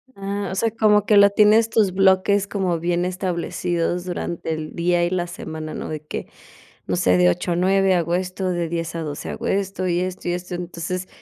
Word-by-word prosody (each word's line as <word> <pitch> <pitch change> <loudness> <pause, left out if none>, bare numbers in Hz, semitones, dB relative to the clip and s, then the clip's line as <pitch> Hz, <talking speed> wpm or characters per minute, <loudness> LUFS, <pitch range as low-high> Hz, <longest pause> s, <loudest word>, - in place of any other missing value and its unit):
Ah, 200 0 -4
o - - -4
sea, 225 +4 +1
como 210 -2 +3
que 210 - +5
lo 200 0 +7
tienes 215 +2 +5
tus 215 -4 +3
bloques 195 +1 +3
como 185 -5 -1
bien 175 +1 0
establecidos 175 -1 -2
durante 170 -2 -4
el 155 -1 -6
día 175 0 +1
y 175 - +1
la 180 -1 -1
semana, 160 -2 -7
¿no?, - - -5
de 155 -1 -5
que, - - -5 0.6
no - - -1
sé, 90 - +3
de 90 0 +5
8 175 - -2
a 170 - 0
9 190 +1 +3
hago 170 -1 0
esto, 185 +1 -2
de 175 -2 -1
10 165 0 -3
a 165 - -3
12 150 -3 -5
hago - - -5
esto, 195 -1 -1
y 175 0 +1
esto, 185 -1 -4
y - - +1
esto, 180 +1 -5
entonces, 175 +1 -5
180 Hz, 215 wpm, -22 LUFS, 170-195 Hz, 0.6 s, lo